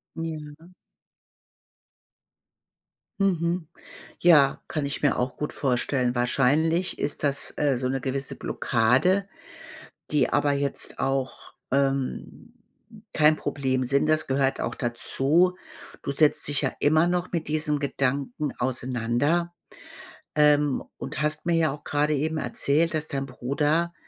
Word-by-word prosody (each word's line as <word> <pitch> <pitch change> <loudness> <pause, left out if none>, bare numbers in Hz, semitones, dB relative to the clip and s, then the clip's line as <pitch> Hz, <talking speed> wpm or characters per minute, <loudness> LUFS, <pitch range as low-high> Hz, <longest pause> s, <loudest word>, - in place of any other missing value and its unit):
Ja. 160 -1 -7 2.5
Mhm. 175 -3 0 0.5
Ja, 150 -6 +5
kann 150 -2 -2
ich 140 - -4
mir 145 - +2
auch 125 +1 -2
gut 150 - -4
vorstellen. 125 -1 0
Wahrscheinlich 145 +8 +1
ist 145 - -2
das, 140 -1 -1
äh, 145 -3 +2
so 130 +1 -3
'ne 135 +1 -1
gewisse 135 +1 -3
Blockade, 135 - +1 0.8
die 150 -4 +2
aber 145 0 +2
jetzt 140 -1 -2
auch, 135 -1 -2 0.2
ähm, 135 - -2 0.6
kein 155 0 +5
Problem 130 -3 -1
sind. 140 +3 +1
Das 155 0 +2
gehört 135 0 +1
auch - - -2
dazu. 145 +9 +1 0.4
Du - - -3
setzt 145 +1 +2
dich 145 -1 0
ja - - 0
immer 155 +3 +3
noch 180 +1 -1
mit 165 -3 -2
diesem 150 -1 0
Gedanken 140 0 -2
auseinander, 130 +7 -1 0.8
ähm, 150 -2 +3
und - - -5
hast 150 +1 -1
mir 170 -1 +2
ja 160 -2 +2
auch 145 - -9
gerade 150 +1 +1
eben 155 +2 -1
erzählt, 155 +2 0
dass 155 0 -2
dein 135 -2 -3
Bruder 145 +6 -1
145 Hz, 125 wpm, -25 LUFS, 135-160 Hz, 2.5 s, Ja